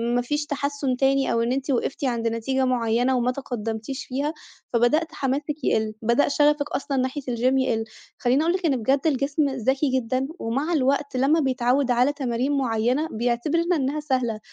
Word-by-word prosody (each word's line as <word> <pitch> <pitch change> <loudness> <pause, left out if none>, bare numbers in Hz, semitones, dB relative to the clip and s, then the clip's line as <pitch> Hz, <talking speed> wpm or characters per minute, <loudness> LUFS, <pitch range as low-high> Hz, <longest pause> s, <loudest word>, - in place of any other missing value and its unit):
ما 245 - +2
فيش 295 +5 -2
تحَسُّن 280 -2 -2
تاني 270 +1 +2
أو 230 - +1
إن 235 +1 0
أنتِ 270 +2 -1
وقفتِ 265 +2 -1
عند 235 -3 0
نتيجة 260 +4 0
معيّنة 245 0 +1
وما 245 +1 +1
تقدَّمتيش 245 0 -5
فيها، 280 +4 -2 0.4
فبدأت 245 +8 +3
حماسِك 285 +3 -2
يقِل، 220 -1 +1
بدأ 235 +5 +2
شَغفِك 295 0 +2
أصلًا 280 -1 -2
ناحية 260 +3 -1
الgym 255 - -5 0.3
يقِل. 230 -4 0 0.3
خلّيني 255 +3 +2
أقول 335 +2 +2
لِك 370 -1 -2
إن 290 -4 +3
بجد 265 +4 +2
الجسم 280 0 +1
ذكي 265 +2 0
جدًا 255 +1 0
ومع 275 +9 -1
الوقت 280 -1 +1
لمّا 280 +5 +3
بيتعوّد 255 -1 +1
على 250 +4 +3
تمارين 260 -1 -1
معيّنة، 250 +4 +1
بيعتبر 240 +8 0
إن 340 +2 +1
إنّها 290 -1 0
سهلة، 255 -7 -1
265 Hz, 175 wpm, -24 LUFS, 240-285 Hz, 0.4 s, فبدأت